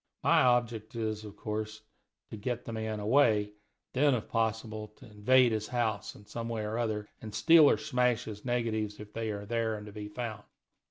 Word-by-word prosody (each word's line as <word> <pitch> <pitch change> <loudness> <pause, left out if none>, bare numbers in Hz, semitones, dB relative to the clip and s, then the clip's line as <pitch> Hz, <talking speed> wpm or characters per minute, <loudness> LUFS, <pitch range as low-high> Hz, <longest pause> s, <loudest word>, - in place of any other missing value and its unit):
My - - +5
object 120 -3 +1
is, 110 -2 -2
of 105 -1 -9
course, 110 +1 -4 0.5
to - - -5
get 120 +3 -3
the 115 - -5
man 110 -1 -3
away, 110 -1 +4
and 105 0 -14 0.4
then, 140 +1 +4
if 115 - -4
possible, 110 -1 -1
to - - -15
invade 120 +4 +4
his 110 -1 -1
house, 115 -4 -1
in 105 - -15
some 115 +2 -5
way 115 -2 -2
or 110 +2 -2
another, 110 -3 -1
and 110 -1 -7
steal 160 +5 +7
or - - +3
smash 125 +2 +1
his 105 -1 -8
negatives 110 -4 -1
if 105 0 -10
they 115 -1 -2
are 100 -1 -4
there 115 0 0
and 105 0 -8
to 105 - -9
be 105 0 -7
found. 110 -1 -5
110 Hz, 205 wpm, -31 LUFS, 105-120 Hz, 0.5 s, steal